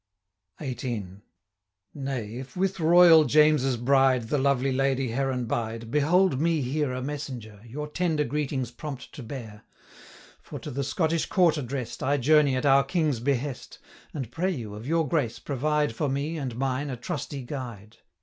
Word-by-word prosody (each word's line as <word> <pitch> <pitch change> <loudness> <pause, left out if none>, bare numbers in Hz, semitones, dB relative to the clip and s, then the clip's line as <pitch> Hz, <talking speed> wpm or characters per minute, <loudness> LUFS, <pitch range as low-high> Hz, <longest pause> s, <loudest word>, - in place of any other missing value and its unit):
XVIII. 120 - -4 0.8
'Nay, 135 -7 -4
if 130 +7 -8
with 190 0 0
Royal 165 0 +7
James's 150 -3 +4
bride 130 -1 +3
The 145 - +1
lovely 135 -1 +2
Lady 135 -1 +1
Heron 130 0 -1
bide, 115 0 -3
Behold 155 +1 +3
me 165 -2 +2
here 140 +2 -1
a 130 0 -4
messenger, 135 -5 -5 0.2
290 - - -15
Your 150 +3 -4
tender 160 -1 0
greetings 135 -2 -2
prompt 135 +1 -8
to 145 - -8
bear; 110 -4 -8 0.8
For, - - -8
to 150 - -7
the 140 +2 -2
Scottish 160 +4 0
court 175 -4 +3
address'd, 130 -3 -4
I 140 +2 +1
journey 145 0 +4
at 130 - -1
our 140 0 +6
King's 150 -4 0
behest, 135 +1 -2 0.3
And 130 -6 -5
pray 175 +8 -1
you, 120 - -4
of 110 +4 -8
your 165 0 +1
grace, 130 -6 0
provide 150 0 0
For 145 +5 -1
me, 140 +4 -2
and 135 -7 -4
mine, 135 +3 -1
a 130 - -4
trusty 135 +3 -5
guide. 120 -5 -7
135 Hz, 165 wpm, -26 LUFS, 125-150 Hz, 0.8 s, Royal